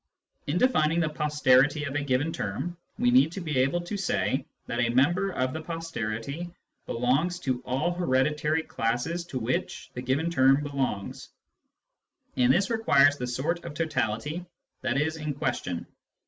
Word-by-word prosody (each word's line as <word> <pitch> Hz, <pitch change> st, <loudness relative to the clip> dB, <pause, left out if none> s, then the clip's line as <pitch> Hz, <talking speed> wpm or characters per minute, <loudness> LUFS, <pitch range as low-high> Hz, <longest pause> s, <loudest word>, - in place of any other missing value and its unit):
In 150 Hz, +4 st, 0 dB
defining 170 Hz, -9 st, +3 dB
the 160 Hz, -2 st, +1 dB
posterity 150 Hz, -1 st, +3 dB
of 140 Hz, -2 st, -4 dB
a 145 Hz, -, 0 dB
given 140 Hz, +4 st, 0 dB
term, 105 Hz, -, -3 dB, 0.2 s
we 125 Hz, -, +3 dB
need 135 Hz, +5 st, +5 dB
to 195 Hz, -, -4 dB
be 155 Hz, -7 st, -1 dB
able 135 Hz, +7 st, +2 dB
to 175 Hz, +4 st, -5 dB
say 190 Hz, -, 0 dB, 0.2 s
that 120 Hz, -, -3 dB
a 120 Hz, -1 st, +2 dB
member 175 Hz, +11 st, +3 dB
of 130 Hz, -8 st, -1 dB
the 160 Hz, -, -4 dB
posterity 155 Hz, -2 st, -4 dB, 0.4 s
belongs 135 Hz, +9 st, +1 dB
to 130 Hz, -2 st, -1 dB
all 135 Hz, +7 st, -1 dB
hereditary 150 Hz, 0 st, +1 dB
classes 120 Hz, +11 st, -2 dB
to 155 Hz, -7 st, -5 dB
which 125 Hz, +1 st, -3 dB
the 125 Hz, -, -5 dB
given 140 Hz, +7 st, 0 dB
term 135 Hz, -1 st, +4 dB
belongs, 135 Hz, -8 st, -3 dB, 1.1 s
and 125 Hz, 0 st, +4 dB
this 190 Hz, -, +2 dB
requires 145 Hz, -11 st, +4 dB
the 125 Hz, -, -3 dB
sort 155 Hz, +8 st, -2 dB
of -, -, -7 dB
totality 150 Hz, +1 st, -1 dB, 0.4 s
that 130 Hz, -, 0 dB
is 160 Hz, +2 st, 0 dB
in 150 Hz, -2 st, -3 dB
question. 90 Hz, -10 st, -2 dB
145 Hz, 160 wpm, -27 LUFS, 130-165 Hz, 1.1 s, need